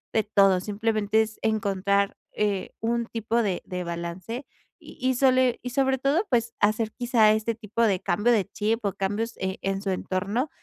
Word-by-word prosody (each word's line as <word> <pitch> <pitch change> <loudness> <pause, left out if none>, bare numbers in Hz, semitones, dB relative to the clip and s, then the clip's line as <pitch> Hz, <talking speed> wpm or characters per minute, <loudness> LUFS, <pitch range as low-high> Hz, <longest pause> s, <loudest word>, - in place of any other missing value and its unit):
de 220 - +5
todo. 195 -3 +4
Simplemente 215 +2 +1
es 220 0 -9
encontrar, 200 -2 +1 0.2
eh, 205 -2 -1
un 235 +1 0
tipo 230 +1 -1
de 195 -5 -1
de 180 -1 -4
balance. 170 +9 -5 0.3
Y - - -14
y 255 0 +2
sole 255 -1 +3
Y 250 - -4
sobre 265 +1 +2
todo, 285 - +1
pues, 235 -2 +1
hacer 215 +1 +1
quizá 240 -3 +3
este 220 +1 0
tipo 220 +1 -4
de 195 -5 +3
cambio 210 +7 +1
de 215 -5 +3
chip 215 +2 -2
o 200 - 0
cambios, 205 +5 -2
eh, 190 0 -3
en 195 0 -1
su 200 - -3
entorno, 200 +8 -1
215 Hz, 180 wpm, -26 LUFS, 195-235 Hz, 0.3 s, de